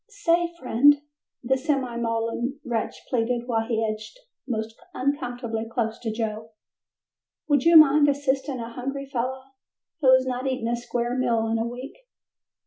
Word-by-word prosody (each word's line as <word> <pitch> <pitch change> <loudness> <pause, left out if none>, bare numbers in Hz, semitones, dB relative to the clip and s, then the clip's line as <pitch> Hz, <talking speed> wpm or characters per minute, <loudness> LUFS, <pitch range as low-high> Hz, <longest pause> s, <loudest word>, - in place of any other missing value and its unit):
"Say, 345 -5 +1
friend," 280 +2 +4 0.4
the 265 +2 +2
semi 265 -4 -1
maudlin 235 +3 -2
wretch 235 -3 -3
pleaded 240 -1 0
while 225 -2 0
he 225 -2 0
edged 215 - -5 0.3
most 220 -2 -3 0.2
uncomfortably 245 -4 -2
close 225 -2 -2
to 225 - -3
Joe, 220 0 -4 0.9
"would 290 -1 +2
you 335 -1 +8
mind 295 -1 +7
assisting 275 -1 -1
a 230 0 -6
hungry 275 +3 -4
fellow 260 0 -3 0.6
who 265 -4 +5
has 260 0 +5
not 255 +1 -2
eaten 255 -3 -1
a 240 - +1
square 240 0 -2
meal 235 -3 +1
in 225 0 0
a 225 - -1
week?" 270 - -9
250 Hz, 150 wpm, -25 LUFS, 230-275 Hz, 0.9 s, you